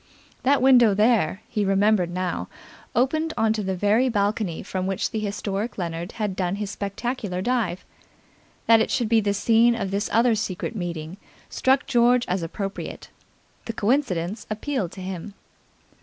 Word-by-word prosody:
That 275 0 +3
window 245 -6 +6
there, 210 -3 +2
he 210 -2 -1
remembered 195 -1 +2
now, 180 0 -3 0.5
opened 310 +6 +1
on 220 0 +3
to 220 - -2
the 190 -1 -2
very 210 +7 +2
balcony 205 -5 -1
from 185 0 -3
which 195 -1 -1
the 220 - -2
historic 205 +1 -3
Leonard 170 -1 -4
had 210 -4 -2
done 185 0 -1
his 205 -1 -4
spectacular 205 -1 -3
dive. 215 -5 -1 0.8
That 230 -1 +6
it - - 0
should 235 -3 0
be 225 -1 +4
the 200 -1 0
scene 230 +3 +4
of 200 -4 -3
this 200 +2 -1
other 230 +2 +4
secret 205 0 -3
meeting 170 -2 -5 0.3
struck 265 +2 +2
George 245 -1 +3
as 180 +1 -1
appropriate. 195 +4 -6 0.5
The 230 - -4
coincidence 210 - -1
appealed 215 - -2
to 190 - -9
him. 190 +2 -6
210 Hz, 155 wpm, -24 LUFS, 190-235 Hz, 0.8 s, window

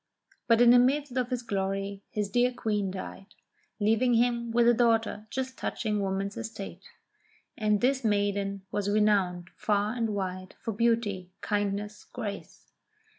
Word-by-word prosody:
But 230 -1 +5
in 240 0 +8
the 245 - +8
midst 270 +1 +2
of 250 -2 0
his 250 -1 -2
glory 195 -1 -2
his 210 -1 -2
dear 245 +4 +2
Queen 210 -5 -1
died, 190 +1 -7 0.5
leaving 225 +4 +3
him 235 0 +2
with 235 +1 +3
a 240 - +7
daughter 225 -2 +1
just 260 +1 -4
touching 215 -2 -1
woman's 195 +1 -2
estate; 200 -5 -7 0.7
and 210 -2 +1
this 265 +1 +2
maiden 200 -2 0
was 205 -1 -1
renowned, 200 -4 +2
far 210 0 0
and 225 -3 -1
wide, 185 -1 -4
for 225 - -3
beauty, 210 -5 0
kindness, 205 0 -2
grace. 210 -5 -7
210 Hz, 145 wpm, -28 LUFS, 200-235 Hz, 0.7 s, in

